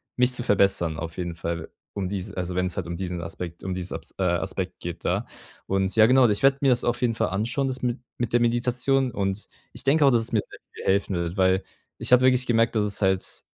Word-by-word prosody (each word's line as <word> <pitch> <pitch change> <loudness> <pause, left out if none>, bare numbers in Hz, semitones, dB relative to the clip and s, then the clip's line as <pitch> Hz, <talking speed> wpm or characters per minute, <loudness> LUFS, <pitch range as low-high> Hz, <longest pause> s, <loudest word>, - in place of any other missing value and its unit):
mich 125 0 +3
zu 125 - +2
verbessern 95 -6 +2
auf 80 +1 -6
jeden 85 -2 -4
Fall, 85 -1 -4 0.2
um 95 -2 -3
dies 95 -1 -5
also, 90 -1 -4
wenn's 90 -1 -1
halt - - -3
um 85 - -4
diesen 90 -1 -4
Aspekt 85 +1 -7
um 95 -1 -3
diese 90 -2 -4
Abs 80 0 -9
äh, - - +1
Aspekt 85 -1 -1
geht, - - -6
da. - - 0 0.4
Und 95 0 0
ja 110 - +8
genau, 125 0 +5
ich 105 +5 -1
werde 135 0 +4
mir 135 - +4
das 120 -1 +2
auf 120 +1 0
jeden 120 -2 +2
Fall 110 -1 +1
anschauen, 115 +8 -1
das 130 0 -4
mit 125 0 -1 0.2
mit 120 -2 -2
der 120 - +4
Meditation. 125 +2 +1
Und 95 0 -3 0.2
ich - - -6
denke 145 +2 +4
auch, 135 - +6
dass 115 -2 +3
es 115 - -3
mir 110 - +2
sehr - - -13
viel - - -9
helfen 100 -1 -1
wird, 85 +1 -3
weil 95 0 +3 0.4
ich - - -3
habe 125 - +7
wirklich 130 0 +4
gemerkt, 115 -1 +2
dass 105 - +2
es 100 +1 -3
halt 95 -1 -1
100 Hz, 250 wpm, -25 LUFS, 90-125 Hz, 0.4 s, ja